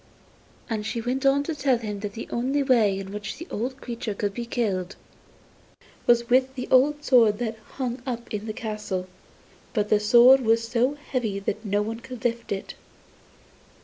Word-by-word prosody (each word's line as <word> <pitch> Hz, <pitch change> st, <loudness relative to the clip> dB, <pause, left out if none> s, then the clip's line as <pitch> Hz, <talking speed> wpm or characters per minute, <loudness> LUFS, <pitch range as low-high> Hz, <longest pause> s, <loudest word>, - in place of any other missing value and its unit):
And 220 Hz, -3 st, -2 dB
she 220 Hz, +2 st, -3 dB
went 255 Hz, +4 st, 0 dB
on 280 Hz, +1 st, +3 dB
to 325 Hz, -, -3 dB
tell 270 Hz, -3 st, +2 dB
him 210 Hz, -3 st, -5 dB
that 205 Hz, -1 st, -5 dB
the 225 Hz, -, -7 dB
only 265 Hz, +4 st, 0 dB
way 225 Hz, -7 st, +3 dB
in 195 Hz, 0 st, -6 dB
which 210 Hz, 0 st, -5 dB
the 335 Hz, -, -8 dB
old 255 Hz, +5 st, -3 dB
creature 235 Hz, -4 st, -5 dB
could 205 Hz, 0 st, -2 dB
be 235 Hz, +1 st, -5 dB
killed 195 Hz, -7 st, -2 dB, 1.1 s
was 235 Hz, 0 st, +4 dB
with 260 Hz, +2 st, +3 dB
the 250 Hz, -, -4 dB, 0.3 s
sword 230 Hz, -7 st, +4 dB
that 225 Hz, -1 st, -3 dB
hung 250 Hz, -2 st, -3 dB
up 235 Hz, -2 st, -4 dB
in 210 Hz, +1 st, -4 dB
the -, -, -2 dB
castle; 210 Hz, -4 st, -4 dB, 0.7 s
but 210 Hz, -1 st, +1 dB
the 210 Hz, -, +4 dB
sword 240 Hz, +5 st, +7 dB
was 230 Hz, -1 st, +2 dB
so 245 Hz, +4 st, +1 dB
heavy 250 Hz, -8 st, -3 dB
that 205 Hz, +2 st, -3 dB
no 205 Hz, -1 st, 0 dB
one 225 Hz, +2 st, -4 dB
could 250 Hz, -1 st, -10 dB
lift 235 Hz, 0 st, -1 dB
it. 195 Hz, -1 st, -4 dB
230 Hz, 180 wpm, -25 LUFS, 210-255 Hz, 1.1 s, sword